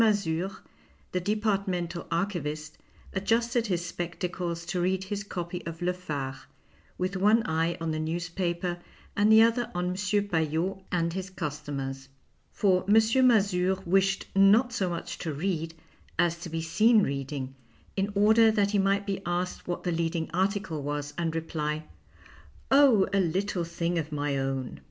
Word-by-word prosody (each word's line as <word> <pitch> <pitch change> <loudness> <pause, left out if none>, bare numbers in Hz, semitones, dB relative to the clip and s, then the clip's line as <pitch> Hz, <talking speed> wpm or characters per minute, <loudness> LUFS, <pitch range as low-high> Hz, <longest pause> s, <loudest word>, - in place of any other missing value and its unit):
Mazure, 195 -4 +1 0.5
the 180 - 0
departmental 195 -4 -1
archivist, 155 -4 -3 0.3
adjusted 230 +4 +1
his 175 -3 -1
spectacles 175 0 -4
to 175 +1 -2
read 190 +1 +1
his 200 +1 -4
copy 175 -2 -5
of 165 0 -6
Le 180 +1 0
Phare, 145 -7 -5 0.6
with 185 +2 -2
one 210 +4 +4
eye 165 +1 0
on 165 -1 -2
the 155 - -2
newspaper 175 +2 -2 0.4
and 210 +2 +4
the 220 +1 +8
other 230 +1 +2
on 180 0 0
M. - - -1
Paillot 195 -3 0
and 170 -2 0
his 190 +1 -4
customers. 140 -5 -5 0.4
For 185 -3 +2
M. 205 - +5 0.3
Mazure 190 -5 +3
wished 195 +2 +2
not 210 +6 +5
so 190 -4 0
much 170 -1 -5
to 165 - -3
read 165 +1 -2 0.4
as 170 0 +2
to 170 - -7
be 165 0 -3
seen 215 +6 +4
reading, 135 -2 -3 0.4
in 195 +1 0
order 220 +2 +6
that 205 -2 +2
he 205 - +2
might 195 +1 +2
be 195 -1 -2
asked 175 +1 -3
what 175 - -3
the 180 - 0
leading 165 -1 -1
article 190 -3 0
was 145 0 -3
and 165 0 -2
reply, 155 -1 -2 0.4
" - - -25
Oh, 270 -8 +6
a 200 - +3
little 185 +1 0
thing 170 0 -1
of 155 0 -5
my 145 -1 -1
own." 135 -1 -2
180 Hz, 155 wpm, -28 LUFS, 165-200 Hz, 0.6 s, the